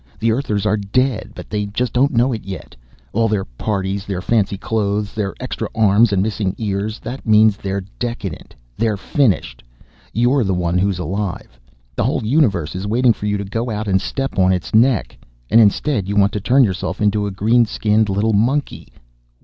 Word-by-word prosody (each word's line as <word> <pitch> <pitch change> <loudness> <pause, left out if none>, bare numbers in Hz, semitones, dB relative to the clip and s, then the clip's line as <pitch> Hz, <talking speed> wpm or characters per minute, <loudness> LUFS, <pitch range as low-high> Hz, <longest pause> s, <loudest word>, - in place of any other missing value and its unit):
The 115 0 +1
Earthers 110 -4 -1
are 105 0 +2
dead, 110 +3 -1
but - - -9
they 105 -1 -1
don't 125 +6 +1
know 125 0 +2
it 110 - -5
yet. 95 -1 -8 0.4
All 115 +1 +2
their 105 -3 -1
parties, 95 - -3
their 100 -3 -4
fancy 100 0 0
clothes, 105 -1 -1
their 100 -3 -3
extra 125 -3 -4
arms 110 0 +4
and 95 -1 +2
missing 105 -3 -2
ears 105 0 -2
that 125 +4 -6
means 110 -1 +5
they're 100 -1 -4 0.2
decadent. 115 -8 -5 0.2
They're 110 -2 0
finished. 100 - 0 0.5
You're 120 +3 +2
the 95 -3 0
one 90 0 0
who's 95 -1 +1
alive; 90 -7 -4 0.4
the - - 0
whole - - 0
universe 110 - +1
is 95 +2 -4
waiting 120 +2 +3
for 105 - -5
you 105 0 0
to 100 - -4
go 115 +5 -3
out 110 -1 -3
and 95 -1 +2
step 135 -7 -3
on 95 0 +4
its 90 -2 -2
neck. 110 - +3 0.4
And 115 - +7
instead 105 0 +1
you 100 - -1
want 100 -1 +4
to 105 - -3
turn 130 +6 +4
yourself 95 -2 -2
into 105 0 +1
a - - -4
green 115 +5 +2
skinned 105 0 +1
little 105 +3 +1
monkey! 130 +8 0
105 Hz, 190 wpm, -19 LUFS, 100-115 Hz, 0.5 s, And